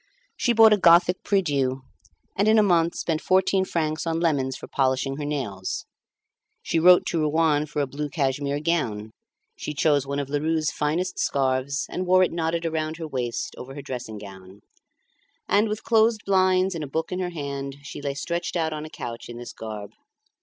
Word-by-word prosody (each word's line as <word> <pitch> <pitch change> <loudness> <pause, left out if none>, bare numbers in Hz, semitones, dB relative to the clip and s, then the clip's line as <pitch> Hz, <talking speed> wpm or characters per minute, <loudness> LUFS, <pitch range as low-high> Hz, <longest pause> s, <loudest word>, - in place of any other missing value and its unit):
She 240 - +1
bought 225 -2 +7
a - - +4
Gothic 175 +1 +5
prie 200 -1 +2
dieu, 135 -4 -1 0.5
and 200 +2 +2
in 220 +1 +5
a 215 - +6
month 170 -3 +2
spent 160 -2 -2
fourteen 190 +1 +2
francs 155 -2 -2
on 165 0 0
lemons 140 -6 0
for - - -10
polishing 135 0 0
her 150 - -4
nails; 115 -11 -3 0.8
she 165 - 0
wrote 180 +2 +6
to 170 - -1
Rouen 155 -1 +2
for 150 0 -1
a - - 0
blue 145 +2 -5
cashmere 140 0 -1
gown; 115 -11 -1 0.4
she 150 - -6
chose 145 -2 +2
one 140 0 -2
of 140 -1 -2
Lheureux's 155 +2 0
finest 165 +5 -1
scarves, 135 0 0
and 185 0 -4
wore 185 +1 +5
it - - +1
knotted 165 0 -1
around 160 -1 -2
her 165 -2 -5
waist 125 -5 -3
over 135 +2 -9
her 145 - -6
dressing 125 -5 -6
gown; 95 -1 -12 0.9
and, 210 +2 +3
with 215 +1 -4
closed 225 -1 +3
blinds 185 -1 +3
and 165 -2 -4
a - - -5
book 160 +3 -3
in 180 - -2
her 180 -1 -1
hand, 140 -4 -5
she 140 - -8
lay 140 -1 -3
stretched 170 +5 -3
out 160 -2 0
on 155 0 -5
a - - -8
couch 120 -5 -7
in 120 - -8
this 120 0 -8
garb. 105 -2 -7
155 Hz, 195 wpm, -25 LUFS, 135-175 Hz, 0.9 s, bought